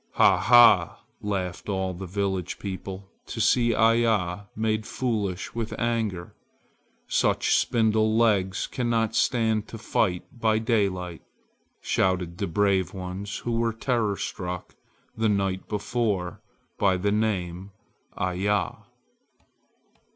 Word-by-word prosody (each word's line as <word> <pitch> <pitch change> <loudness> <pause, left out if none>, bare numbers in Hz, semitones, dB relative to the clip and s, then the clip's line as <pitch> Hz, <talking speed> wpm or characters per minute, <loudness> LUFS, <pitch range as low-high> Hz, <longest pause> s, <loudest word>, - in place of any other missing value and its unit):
"Ha! - - +5
ha!" 120 0 +6 0.2
laughed 95 -2 -3
all 95 -1 -1
the 95 +2 -7
village 95 -1 -2
people 95 0 -7 0.2
to - - -6
see 120 +1 +3
Iya 110 -5 +2
made 110 -1 -1
foolish 105 -7 -2
with 115 -1 -4
anger. 110 -7 -2 0.7
"Such - - +1
spindle 110 -2 +2
legs 100 -5 +2
cannot 115 -3 -1
stand 110 -4 +1
to 115 - -8
fight 100 -4 0
by 110 -2 +1
daylight!" 100 -7 -1 0.6
shouted 90 -2 0
the - - -1
brave 95 +1 +1
ones 95 +2 -5
who 120 - -1
were 115 0 0
terror 115 -3 0
struck 90 -1 -5 0.4
the 110 -1 +1
night 95 -2 -1
before 105 -4 -2 0.4
by 95 -2 +3
the 100 +3 0
name 95 -4 -1 0.5
"Iya." 95 +2 0
105 Hz, 115 wpm, -26 LUFS, 95-115 Hz, 0.7 s, ha